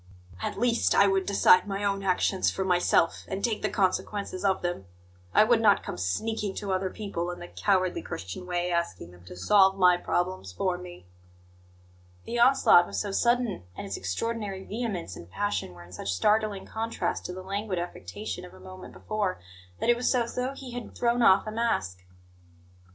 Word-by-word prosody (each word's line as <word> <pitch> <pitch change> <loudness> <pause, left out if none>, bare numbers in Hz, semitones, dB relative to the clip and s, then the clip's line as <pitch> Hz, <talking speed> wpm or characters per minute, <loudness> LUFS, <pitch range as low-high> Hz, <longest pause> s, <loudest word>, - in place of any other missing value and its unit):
"At - - -3
least, 240 0 +2
I 200 - +6
would 195 -1 +1
decide 195 -1 +5
my 200 0 -3
own 200 -1 0
actions 190 0 +1
for 190 - -3
myself, 175 -2 +2
and 195 +1 -4
take 225 -3 -1
the - - 0
consequences 195 -1 -1
of 190 -2 +1
them. 175 - -3 0.5
I - - +6
would 225 +1 +3
not 205 -3 +4
come - - -5
sneaking 205 - -2
to 200 -2 -4
other 185 0 0
people, 185 -4 -4
in 175 - -5
the 175 - -9
cowardly 185 -2 0
Christian 95 - -7
way, 175 0 -1
asking 105 - -2
them 90 0 -17
to 90 - -10
solve 195 - +4
my 180 -2 +5
problems 175 - -2
for 180 - -1
me!" 175 - -11 1.2
The 240 - -3
onslaught 240 -8 +6
was - - -5
so 205 - -2
sudden, 235 - +1 0.2
and - - -5
its 100 -1 -4
extraordinary 195 - -3
vehemence 205 - -4
and 85 - -11
passion 205 - -2
were 85 - -12
in 85 - -16
such 95 +2 -4
startling 210 - +1
contrast 225 +1 -3
to 180 - -6
the 185 0 -8
languid 200 0 -3
affectation 130 - -5
of 90 - -12
a - - -15
moment 95 0 -11
before, 185 - -2 0.4
that 240 - +3
it - - +3
was 245 +2 +1
as 235 -1 0
though 255 +2 -2
he 265 -2 -9
had 245 -1 -7
thrown 240 0 +1
off 195 -2 +5
a 215 - -4
mask. 215 - -1
190 Hz, 190 wpm, -27 LUFS, 175-215 Hz, 1.2 s, I